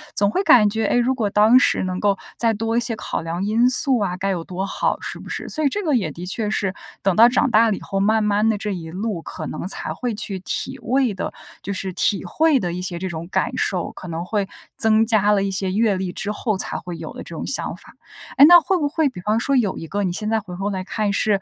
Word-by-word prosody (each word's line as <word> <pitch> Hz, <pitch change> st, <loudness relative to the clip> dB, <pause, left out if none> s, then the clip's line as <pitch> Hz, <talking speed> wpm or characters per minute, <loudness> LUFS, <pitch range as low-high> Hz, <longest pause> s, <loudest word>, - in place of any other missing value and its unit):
总 200 Hz, 0 st, +3 dB
会 295 Hz, -, 0 dB
感 215 Hz, -, +6 dB
觉， 220 Hz, +1 st, -1 dB
诶， 225 Hz, -, +2 dB
如 245 Hz, +2 st, +2 dB
果 220 Hz, -5 st, 0 dB
当 215 Hz, +4 st, +5 dB
时 -, -, +2 dB
能 185 Hz, 0 st, -3 dB
够 200 Hz, -1 st, +2 dB, 0.2 s
再 230 Hz, -1 st, +2 dB
多 225 Hz, +1 st, -2 dB
一 -, -, +5 dB
些 240 Hz, -1 st, -2 dB
考 -, -, -4 dB
量 165 Hz, +3 st, -3 dB
因 225 Hz, +4 st, +3 dB
素 255 Hz, 0 st, +1 dB
啊， 185 Hz, -3 st, -1 dB
该 195 Hz, +2 st, -2 dB
有 180 Hz, -4 st, -2 dB
多 185 Hz, +3 st, -4 dB
好， -, -, -1 dB
是 -, -, -5 dB
不 -, -, -11 dB
是？ -, -, -4 dB
所 310 Hz, -, -3 dB
以 285 Hz, -, +4 dB
这 410 Hz, +8 st, -3 dB
个 310 Hz, -4 st, +1 dB
也 190 Hz, -10 st, 0 dB
的 170 Hz, +5 st, -8 dB
确 210 Hz, +3 st, -2 dB
是 200 Hz, -3 st, -1 dB, 0.3 s
等 195 Hz, -2 st, +2 dB
到 230 Hz, +2 st, +7 dB
长 260 Hz, +3 st, +2 dB
大 225 Hz, +1 st, +5 dB
了 210 Hz, -, +1 dB
以 -, -, -9 dB
后， 195 Hz, -1 st, -3 dB
慢 215 Hz, +2 st, +2 dB
慢 210 Hz, +1 st, +2 dB
地 220 Hz, -, +1 dB
这 210 Hz, +1 st, -3 dB
一 165 Hz, -3 st, -6 dB
路 195 Hz, 0 st, -3 dB
可 160 Hz, -, -7 dB
能 155 Hz, +5 st, -5 dB
才 -, -, -4 dB
会 245 Hz, -2 st, -3 dB
去 200 Hz, -2 st, -4 dB
体 260 Hz, +7 st, -4 dB
味 255 Hz, -2 st, +1 dB
的， 190 Hz, -, -4 dB, 0.3 s
就 200 Hz, -, -5 dB
是 190 Hz, 0 st, -3 dB
体 195 Hz, +2 st, +1 dB
会 300 Hz, -, +2 dB
的 175 Hz, -5 st, -3 dB
一 180 Hz, -, -4 dB
些 180 Hz, -1 st, -4 dB
这 190 Hz, -, -3 dB
种 165 Hz, -1 st, -6 dB
感 -, -, 0 dB
受， 180 Hz, -3 st, -1 dB
可 185 Hz, -, -10 dB
能 170 Hz, 0 st, -4 dB
会 200 Hz, 0 st, -1 dB, 0.3 s
增 220 Hz, 0 st, +4 dB
加 210 Hz, -2 st, +3 dB
了 200 Hz, -1 st, +2 dB
一 195 Hz, -, -1 dB
些 190 Hz, 0 st, -1 dB
阅 210 Hz, +1 st, +2 dB
历 185 Hz, -1 st, -3 dB
之 210 Hz, +3 st, -3 dB
后 210 Hz, -1 st, -2 dB
才 -, -, -4 dB
会 175 Hz, -2 st, -7 dB
有 160 Hz, -1 st, -7 dB
的 -, -, -8 dB
这 -, -, -9 dB
种 -, -, -5 dB
想 -, -, -2 dB
法。 -, -, -16 dB, 0.4 s
哎， 280 Hz, -, +10 dB
那 350 Hz, +1 st, +10 dB
会 375 Hz, +5 st, +1 dB
不 295 Hz, -4 st, 0 dB
会 315 Hz, 0 st, +1 dB
比 255 Hz, -, -10 dB
方 210 Hz, +4 st, +1 dB
说 275 Hz, +3 st, +1 dB
有 220 Hz, -7 st, +1 dB
一 165 Hz, -, -7 dB
个 200 Hz, +4 st, -2 dB
你 185 Hz, -, 0 dB
现 210 Hz, +4 st, -3 dB
在 225 Hz, -, +2 dB
回 185 Hz, -4 st, -9 dB
头 195 Hz, +2 st, -2 dB
来 190 Hz, -2 st, -3 dB
看， 210 Hz, +1 st, -1 dB
是， 205 Hz, 0 st, +2 dB
205 Hz, 295 characters per minute, -21 LUFS, 185-230 Hz, 0.4 s, 哎